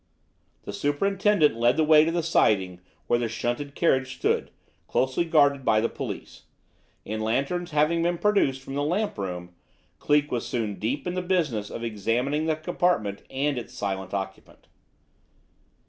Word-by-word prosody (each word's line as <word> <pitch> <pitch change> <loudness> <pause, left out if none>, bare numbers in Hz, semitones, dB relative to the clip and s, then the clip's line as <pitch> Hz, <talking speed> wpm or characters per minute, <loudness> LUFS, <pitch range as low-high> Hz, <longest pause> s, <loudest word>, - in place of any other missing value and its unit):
The 100 - -7
superintendent 180 - +2
led 120 +2 +2
the 160 - +4
way 155 0 +6
to 165 - 0
the 170 0 -1
siding 95 - +2 0.2
where 120 - +2
the 120 -1 -1
shunted 120 +5 -3
carriage 130 -5 +1
stood, - - 0 0.4
closely 130 +6 +1
guarded 145 -4 +3
by 110 -3 +3
the 115 - 0
police; - - -7 0.6
and, 110 +1 -4
lanterns 140 +11 -1
having 155 +2 +2
been 175 +1 +1
procured 200 -10 +2
from 135 0 -9
the 140 - -1
lamp 180 - -1
room, 90 -2 -5 0.5
Cleek 145 0 +2
was 120 - -1
soon 110 -4 -3
deep 125 +7 -2
in 180 - -2
the 185 - -1
business 160 - 0
of 115 - -6
examining 120 +8 -1
the 160 - +2
compartment 155 - 0
and 140 0 -1
its 120 +1 -10
silent 95 -4 -3
occupant. 95 -1 -6
135 Hz, 160 wpm, -26 LUFS, 110-160 Hz, 0.6 s, way